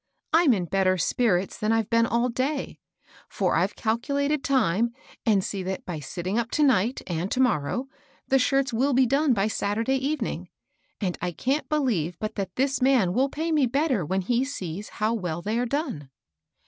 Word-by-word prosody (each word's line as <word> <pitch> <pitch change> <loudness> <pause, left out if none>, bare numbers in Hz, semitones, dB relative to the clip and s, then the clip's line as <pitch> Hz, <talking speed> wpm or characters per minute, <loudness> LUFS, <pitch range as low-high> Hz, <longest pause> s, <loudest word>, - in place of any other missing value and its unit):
I'm 325 -3 +5
in 185 -5 -1
better 185 +1 +2
spirits 185 0 +1
than 215 +1 +1
I've 225 -1 0
been 230 0 +4
all 235 +2 +1
day; 265 +4 -2 0.5
for - - 0
I've - - +1
calculated 280 +6 0
time, 235 -3 +1 0.3
and 200 -4 +4
see 195 0 -3
that 190 +1 -4
by 170 -4 -4
sitting 180 - -3
up 235 0 -2
to 305 - +4
night 245 -3 +2
and 175 +2 -2
to 255 - -2
morrow, 245 - +1 0.4
the 270 - +3
shirts 270 0 +1
will 265 +5 +2
be 260 +1 +5
done 275 +2 +2
by 200 0 +1
Saturday 220 +5 0
evening; 300 +3 -2 0.5
and 185 -4 -2
I 180 0 -1
can't 270 - -1
be 305 - +1
lieve 180 - 0
but 215 +2 -4
that 195 -2 -4
this 270 +1 0
man 250 -9 +3
will 265 +6 +2
pay 320 +4 -3
me 295 -5 +3
better 270 - +1
when 190 +5 -1
he 240 +6 +1
sees 200 - -5
how 215 +2 +1
well 175 -6 -3
they 220 +3 -1
are 245 - 0
done." 250 - -3
230 Hz, 190 wpm, -26 LUFS, 190-270 Hz, 0.5 s, I'm